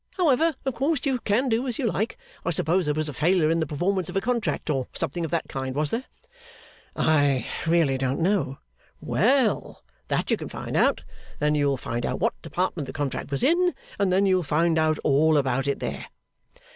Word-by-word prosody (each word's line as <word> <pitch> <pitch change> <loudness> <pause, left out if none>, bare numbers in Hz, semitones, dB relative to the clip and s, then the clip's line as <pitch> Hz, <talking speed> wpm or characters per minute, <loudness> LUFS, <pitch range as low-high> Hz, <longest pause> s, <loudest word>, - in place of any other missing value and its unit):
However, 325 -2 +3
of 265 - 0
course, 280 +3 0
you 270 -3 0
can 230 +5 +1
do 240 +2 0
as 240 - -3
you 265 - -1
like. 220 0 -1 0.3
I - - -1
suppose 170 +2 +2
there 150 - +1
was 155 0 0
a 150 - -4
failure 160 +2 +2
in 165 - +1
the 160 - -1
performance 180 +4 -1
of - - -3
a - - +4
contract, 235 +1 -1
or 135 -3 -1
something 170 +5 -3
of 165 - -2
that 165 0 -1
kind, 130 -1 -4
was 150 0 0
there?' 245 +3 -2 0.9
'I 145 -4 +2 0.2
really 160 -6 +3
don't 130 +2 -1
know.' 170 -6 0 0.4
'Well! 245 0 +1 0.2
That - - -1
you - - +3
can - - -7
find - - -6
out. - - +2 0.3
Then 150 0 +1
you'll 145 -2 +1
find 120 0 -4
out - - -2
what 230 +5 +1
Department 165 -2 -2
the - - -7
contract 145 -1 -3
was 140 -1 -1
in, 355 +4 +3 0.2
and 200 -2 +2
then 190 +2 +3
you'll 185 -1 +3
find 165 +1 +1
out 155 -1 +2
all 155 +2 +4
about 135 -1 0
it 140 - 0
there. - - -4
165 Hz, 205 wpm, -25 LUFS, 145-220 Hz, 0.9 s, a